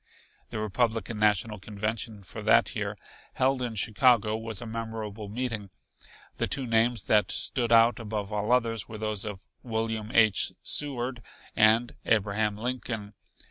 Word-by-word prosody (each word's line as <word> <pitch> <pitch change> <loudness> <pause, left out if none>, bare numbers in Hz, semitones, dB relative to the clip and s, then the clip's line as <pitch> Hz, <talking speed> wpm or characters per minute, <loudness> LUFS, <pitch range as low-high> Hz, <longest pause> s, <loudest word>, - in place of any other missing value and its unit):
The - - -5
Republican 110 +1 -1
National 105 0 +2
Convention 105 +1 -4
for - - -8
that - - +3
year, - - -3 0.4
held 130 0 +1
in 120 -3 -3
Chicago, 110 +1 +3
was 110 -2 -4
a - - -6
memorable 110 -2 -5
meeting. 110 -3 -3 0.7
The - - 0
two 135 - -1
names 115 0 +2
that 105 -3 +3
stood 120 -2 +1
out 115 +1 +5
above 105 -2 -4
all 105 +2 -1
others 115 -4 +1
were 110 - -7
those 110 -1 -2
of 100 -3 -7
William 110 -2 -3
H. 110 -6 +4
Seward 130 -4 0 0.3
and 115 +2 +4
Abraham 105 -1 +1
Lincoln. 115 -3 -4
110 Hz, 140 wpm, -28 LUFS, 105-120 Hz, 0.7 s, out